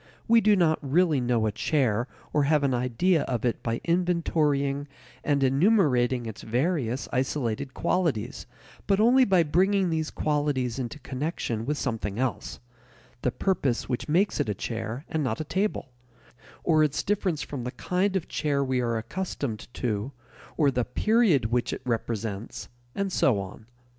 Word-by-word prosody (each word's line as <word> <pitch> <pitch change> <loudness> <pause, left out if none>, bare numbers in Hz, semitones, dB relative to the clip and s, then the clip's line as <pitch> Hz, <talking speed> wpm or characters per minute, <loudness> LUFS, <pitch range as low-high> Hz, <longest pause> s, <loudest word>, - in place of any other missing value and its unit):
We 230 0 +6
do 210 -1 +5
not 165 -4 +3
really 150 0 +2
know 120 -2 +1
a 110 - +1
chair 125 -3 0 0.3
or 150 -2 +3
have 150 0 +3
an 135 -2 +2
idea 125 +8 +2
of 125 -2 -2
it 120 - 0
by 115 0 -2
inventorying 155 -5 +1 0.4
and 140 -2 +1
enumerating 135 - +3
its 110 -2 -7
various 130 0 -1
isolated 130 -1 -1
qualities, 165 - -1 0.4
but 195 0 +3
only 250 +4 +5
by 185 -5 +4
bringing 185 +4 +2
these 160 -1 -1
qualities 145 -5 -1
into 125 +3 -4
connection 130 -4 -3
with 150 +1 0
something 110 -7 -3
else 130 0 -2 0.6
the - - +1
purpose 140 -6 0
which 125 +3 -3
makes 185 +6 +2
it - - 0
a 105 - -1
chair 115 - -4
and 160 -2 -1
not 115 -5 -1
a - - -1
table; 190 -5 -2 0.7
or 155 -2 +4
its 150 -2 0
difference 190 -6 0
from 135 -4 -6
the 125 - -3
kind 180 +9 -1
of 190 - -1
chair 145 -3 0
we 130 -2 0
are 115 -1 0
accustomed 120 - -4
to, 110 +1 -2 0.5
or 145 -4 +4
the 125 -1 0
"period" 205 - +2
which 120 0 +1
it - - -5
represents, 115 -3 -3 0.3
and 200 -1 -1
so 120 -10 +3
on. 100 +3 -8
140 Hz, 160 wpm, -27 LUFS, 120-170 Hz, 0.7 s, We